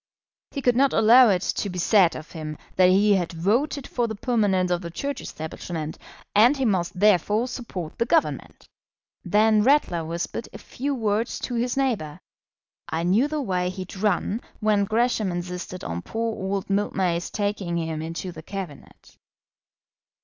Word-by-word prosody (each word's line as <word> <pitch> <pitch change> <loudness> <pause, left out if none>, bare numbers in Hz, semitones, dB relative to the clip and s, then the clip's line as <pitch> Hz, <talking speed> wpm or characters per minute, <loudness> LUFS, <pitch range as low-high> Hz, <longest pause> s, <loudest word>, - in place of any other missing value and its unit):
He 275 - -5
could 245 -1 +3
not 270 +2 +3
allow 235 +2 +7
it 185 -2 +1
to 200 - -2
be 180 - -6
said 180 -1 +4
of 155 - -9
him 155 -2 -6 0.2
that 185 -1 +5
he 205 +3 +4
had 180 -4 0
voted 235 - 0
for 240 -2 -1
the 220 - -4
permanence 200 -6 +1
of 175 0 0
the 170 - -6
Church 280 +12 -4
establishment, 160 0 -6 0.3
and 235 +7 +5
he 265 - 0
must 185 -3 0
therefore 210 +3 +3
support 195 -10 -6
the 235 - +1
Government. 325 +4 0 0.6
Then 215 +1 +4
Ratler 225 - +3
whispered 170 +7 -4
a - - -7
few 280 +2 -4
words 220 0 -1
to 250 - -4
his 240 +2 -1
neighbour: 205 - -1 0.7
"I 165 0 -2
knew 200 +10 +3
the 300 -1 -2
way 180 -5 0
he'd 185 0 -7
run 205 +2 0 0.2
when 210 -2 +2
Gresham 220 -2 +1
insisted 180 +1 -5
on 85 +1 -4
poor 225 - -3
old 195 0 -3
Mildmay's 190 -3 0
taking 200 -4 -2
him 160 -2 -3
into 165 +3 -5
the 160 -2 -10
Cabinet." 185 -4 -9
200 Hz, 165 wpm, -24 LUFS, 175-230 Hz, 0.7 s, allow